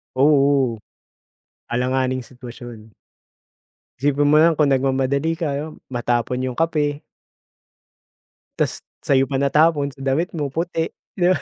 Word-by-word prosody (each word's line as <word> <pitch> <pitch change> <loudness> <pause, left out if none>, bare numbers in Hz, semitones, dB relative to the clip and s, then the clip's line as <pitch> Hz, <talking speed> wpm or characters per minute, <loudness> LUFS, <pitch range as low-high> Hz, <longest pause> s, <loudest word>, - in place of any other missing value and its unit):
Oo. 140 -4 +3 0.9
Alanganing 130 +1 0
sitwasyon. 120 -3 -11 1.0
Isipin 145 +1 +2
mo 150 +1 +5
nalang 165 -2 +3
kung 150 - +4
nagmamadali 135 +4 0
ka, 150 -1 -2 0.2
matapon 120 0 -1
yung 125 - -10
kape. 150 -3 0 1.6
Tapos - - -1 0.2
sa'yo 135 -1 +3
pa 135 - -2
natapon 145 +1 +2
damit 135 +6 0
mo 150 -3 -2
puti, 165 +2 -2 0.3
'di 175 - +3
ba. - - -1
140 Hz, 110 wpm, -21 LUFS, 130-150 Hz, 1.6 s, mo